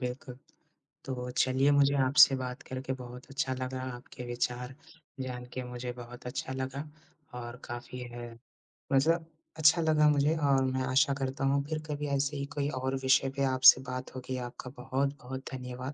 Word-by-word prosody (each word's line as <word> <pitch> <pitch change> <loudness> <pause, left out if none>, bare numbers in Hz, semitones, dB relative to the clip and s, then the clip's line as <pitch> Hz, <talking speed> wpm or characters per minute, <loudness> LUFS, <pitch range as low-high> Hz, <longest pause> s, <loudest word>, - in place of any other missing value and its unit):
बिल्कुल। 125 0 -5 0.7
तो 125 -1 -4
चलिए 130 +2 +3
मुझे 140 0 +4
आपसे 140 +1 +7
बात 125 0 -5
करके 130 0 -4
बहुत 125 0 -9
अच्छा 135 -1 -1
लगा। 130 0 -4 0.2
आपके 125 0 -10
विचार 125 +1 -2 0.5
जान 125 -1 -4
के 130 - -4
मुझे 125 0 -5
बहुत 120 +1 -10
अच्छा 125 +1 -4
लगा 130 +1 -3 0.6
और 120 0 -7
काफ़ी 120 +1 -7
है। 120 0 -7 0.6
बस 135 +2 +4
अच्छा 160 0 +2
लगा 155 -1 +4
मुझे 145 +2 +3
और 135 -1 +4
मैं 130 0 0
आशा 140 +2 +3
करता 135 0 -2
हूँ 140 +1 +2
फिर 155 -1 -1
कभी 150 0 -3
ऐसे 140 +1 -1
ही 140 - -2
कोई 140 -1 +1
और 130 +1 -1
विषय 130 0 +4
पे 140 - +1
आपसे 130 0 +8
बात 130 0 -5
होगी। 130 0 -4
आपका 125 - -9
बहुत-बहुत 135 0 -2
धन्यवाद। 125 +1 -6
130 Hz, 165 wpm, -30 LUFS, 125-140 Hz, 0.7 s, आपसे